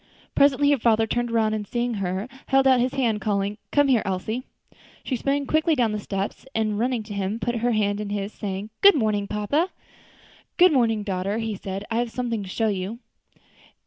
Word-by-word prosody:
Presently 285 +1 +4
her 285 - +2
father 225 -1 +3
turned 240 +2 -1
round, 225 -2 +1
and 210 -1 -3
seeing 240 +2 -1
her, 190 +3 -2 0.2
held 270 0 +3
out 260 -2 +5
his 255 +2 0
hand, 230 -6 0
calling, 205 0 -1
"Come 290 -1 +4
here, 250 -5 +4
Elsie." 195 +6 -2 0.6
She 260 - -2
sprang 275 +3 -1
quickly 310 +3 +2
down 240 -5 +2
the 210 - -2
steps, 195 -1 -4
and 215 -2 0
running 245 -1 0
to 210 -1 -8
him, 200 +2 -2
put 240 0 -1
her 240 +1 +1
hand 205 -1 0
in 210 - -5
his, 205 0 -3
saying, 200 +1 -5
"Good 400 -1 +8
morning, 215 -6 0
papa." 285 - 0 0.9
"Good 360 -2 +6
morning, 225 -5 +2
daughter," 195 +2 -2 0.2
said 195 +1 -4
he, 225 - -5
"I - - +2
have 240 -1 -1
something 235 -2 -2
to 195 - -8
show 225 +4 0
you." 195 +3 -3
220 Hz, 200 wpm, -24 LUFS, 205-250 Hz, 0.9 s, Good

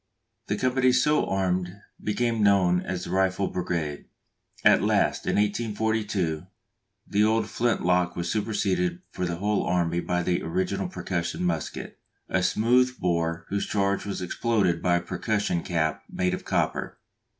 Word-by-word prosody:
The - - -1
companies 130 0 +3
so 150 0 +2
armed 95 0 -1 0.2
became 115 +1 0
known 95 -3 +4
as 90 -1 -4
the - - -6
Rifle 95 +1 +1
Brigade. 85 -5 -3 0.6
At - - +6
last, - - +1
in - - +1
1842, 105 -5 0 0.6
the 105 +1 +2
old 110 0 +2
flint 120 -2 0
lock 90 0 +2
was 85 0 -3
superseded 95 -5 0
for 90 - -2
the 85 - -2
whole 105 +4 0
army 85 -1 +1
by 90 0 -1
the 90 0 0
original 185 +1 -1
percussion 90 - -3
musket, 85 -3 -3 0.3
a 95 - +1
smooth 125 +7 +3
bore 85 -1 0
whose 100 0 -1
charge 100 -1 0
was 100 -2 -3
exploded 95 -3 +1
by 90 -1 +3
a 85 - +1
percussion 100 -1 -1
cap 80 -3 -1
made 90 0 0
of - - -5
copper. - - -1
95 Hz, 150 wpm, -26 LUFS, 90-110 Hz, 0.6 s, At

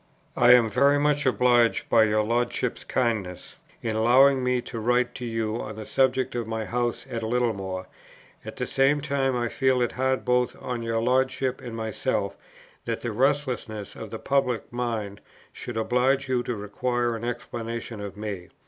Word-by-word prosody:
I 120 0 +7
am 120 -2 +6
very 140 +7 +3
much 145 -1 +1
obliged 120 -2 +3
by 110 - +5
your 105 0 +2
Lordship's 120 +2 -1
kindness 110 -8 -2 0.3
in 110 -2 -1
allowing 130 +4 +5
me 125 0 +1
to 115 - -6
write 120 +2 +1
to 125 - -6
you 115 -1 -2
on 110 0 -6
the 110 0 -7
subject 130 +1 +1
of 120 -2 -3
my 110 -1 -3
house 120 0 -2
at 115 - -4
Littlemore; 110 -6 -1 0.6
at 110 - -8
the 125 - -1
same 135 +3 +2
time 140 -3 0
I 120 -1 0
feel 130 +1 +1
it 120 -1 +1
hard 130 0 -1
both 125 0 +1
on 125 -2 -4
your 115 0 -1
Lordship 130 +1 +1
and 120 -3 -7
myself 110 -2 -2 0.5
that - - -3
the 120 - -3
restlessness 125 -4 -1
of 110 - -8
the 110 - -5
public 125 -3 -1
mind 115 -5 -3 0.3
should 120 -2 -6
oblige 125 +4 +1
you 130 -2 +1
to 125 - -2
require 120 +3 -1
an 115 - -7
explanation 115 -2 -5
of 100 -1 -7
me. 100 -4 -5
120 Hz, 175 wpm, -26 LUFS, 110-130 Hz, 0.6 s, I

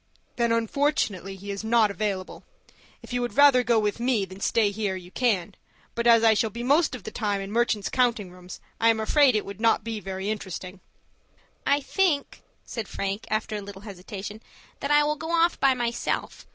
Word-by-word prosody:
"Then, 235 -1 +1
unfortunately, 230 -5 0
he 200 +1 -7
is 200 +2 -5
not 220 -2 +3
available. 195 -1 -4 0.6
If - - -9
you 245 - 0
would 245 +2 -4
rather 285 -3 +7
go 235 -1 +2
with 210 0 0
me 240 -4 +1
than 190 +1 -12
stay 210 0 +2
here, 205 -2 -2
you 180 -1 -10
can, 205 -7 0 0.4
but 235 0 -1
as 230 -1 +6
I 225 -1 +6
shall 220 +1 +1
be 235 +3 -6
most 285 +3 +3
of 240 - -10
the 220 - -7
time 205 -3 -1
in 195 0 -6
merchants' 220 -3 +1
counting 235 -7 0
rooms, 180 0 -11 0.2
I 230 - +4
am 225 -1 +2
afraid 260 +3 +4
it 215 - 0
would 200 +1 -9
not 230 -1 +3
be 225 -1 -4
very 190 -1 -5
interesting." 190 -2 -6 0.9
"I 285 +1 +3
think," 330 -2 0 0.2
said 225 -4 -5
Frank, 200 +2 -4
after 215 0 -1
a - - -5
little 200 0 -10
hesitation, 205 +1 -8 0.4
"that 280 - -3
I 295 0 +5
will 300 +1 0
go 320 +2 -6
off 335 +1 +2
by 270 -1 +4
myself. 240 -1 -3
220 Hz, 200 wpm, -26 LUFS, 200-245 Hz, 0.9 s, rather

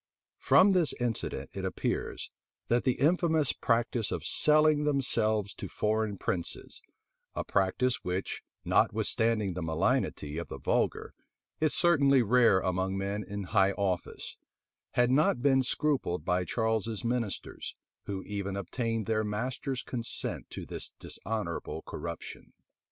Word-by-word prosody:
[*] - - -64
From 195 - +6
this 180 -5 +3
incident 120 -3 -2
it - - -5
appears, - - -3 0.4
that 120 +1 +2
the 130 - +4
infamous 160 -1 +3
practice 115 -1 0
of - - -3
selling 155 0 +4
themselves 110 -8 +1
to - - -7
foreign 110 -1 -1
princes, 85 -2 -4 0.5
a - - -1
practice 110 +7 +1
which, 90 +2 -3 0.2
notwithstanding 110 -4 +2
the 90 - -4
malignity 80 -1 0
of 85 - -5
the - - -7
vulgar, - - 0 0.5
is 155 -1 +2
certainly 140 -7 +5
rare 115 -4 +5
among 95 +1 -1
men 100 +2 -2
in 100 0 -5
high 95 0 +3
office, 95 -3 -2 0.6
had 125 0 +3
not 135 -2 +3
been 135 -2 +5
scrupled 130 - 0
by 90 +1 +1
Charles's 110 0 -1
ministers, 115 -4 -3 0.3
who 95 -2 -4
even 100 -1 -4
obtained 115 +3 -2
their 110 0 +1
master's 125 +5 -3
consent 120 -2 -3
to - - -7
this - - -5
dishonorable 110 +1 -4
corruption. 85 -1 -7
110 Hz, 130 wpm, -30 LUFS, 95-130 Hz, 0.6 s, From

